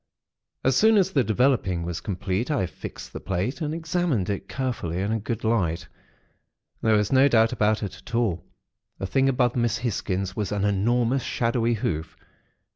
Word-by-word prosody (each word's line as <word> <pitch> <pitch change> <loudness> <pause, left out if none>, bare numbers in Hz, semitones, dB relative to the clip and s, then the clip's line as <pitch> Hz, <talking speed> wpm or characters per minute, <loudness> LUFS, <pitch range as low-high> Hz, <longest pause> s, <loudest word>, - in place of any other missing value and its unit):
"As 130 -1 +3
soon 220 +7 +5
as 190 -1 +3
the 140 -8 +3
developing 110 -6 +1
was 85 -1 -4
complete, 100 - -2
I 140 -11 +1
fixed - - -9
the - - -5
plate, 95 - -2
and 150 -1 -1
examined 160 - 0
it 100 - -5
carefully 120 -11 -2
in 100 +3 -1
a 110 - 0
good 115 +2 -4
light. 95 -8 0 0.9
There 110 -1 +3
was 105 -1 0
no 135 +1 +6
doubt 115 -4 +4
about 110 +1 +1
it 100 - -4
at 120 - -8
all; 110 -8 0 0.5
the - - -4
thing 135 +7 +2
above 125 -2 +1
Miss 120 -2 +1
Hisgins 95 -5 -2
was 105 -3 -2
an 105 -1 0
enormous, 120 +6 +2
shadowy 115 0 0
hoof. 80 -6 -3
115 Hz, 175 wpm, -25 LUFS, 95-130 Hz, 0.9 s, no